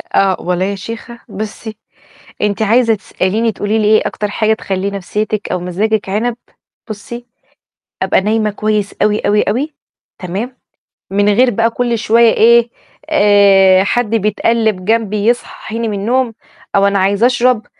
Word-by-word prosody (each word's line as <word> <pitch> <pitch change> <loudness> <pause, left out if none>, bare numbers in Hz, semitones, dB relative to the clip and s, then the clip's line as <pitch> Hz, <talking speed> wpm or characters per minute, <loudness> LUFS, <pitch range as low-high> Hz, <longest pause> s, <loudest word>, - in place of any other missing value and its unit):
آه. 195 -1 +3
والله 180 +1 -1
يا 200 +1 -2
شيخة 230 +4 -8
بُصّي، 215 +1 -7 0.7
أنتِ 210 +1 0
عايزة 230 +2 +3
تسأليني 215 +2 -1
تقولي 205 +3 -1
لي 215 - 0
إيه 215 +1 +3
أكتر 210 - -3
حاجة 220 +1 +1
تخلّي 195 -2 -3
نفسيّتِك 210 +2 -3
أو 180 - -1
مزاجِك 205 +4 -1
عنب، 225 +4 -1 0.5
بُصّي، 235 +3 -8 0.8
أبقى - - +2
نايمة 215 +1 0
كويس 210 0 -2
أوي، 210 0 +2
أوي، 210 +1 +2
أوي، 270 +9 -2 0.5
تمام؟ 205 +8 -5 0.5
من 205 +1 +2
غير 250 +4 +4
بقى 230 +1 +1
كُلّ 235 0 -1
شوية 230 +1 +3
إيه 235 +1 +4 0.4
آآ، 200 -7 +5
حد 240 +2 0
بيتقلّب 215 -2 0
جنبي 215 -2 0
يصحّيني 230 -1 -2
من 205 -2 -3
النوم، 240 +2 0 0.4
أو 200 0 +4
أنا 200 0 +1
عايز 200 +3 +1
أشرب، 245 -2 +2
215 Hz, 145 wpm, -15 LUFS, 200-230 Hz, 0.8 s, آآ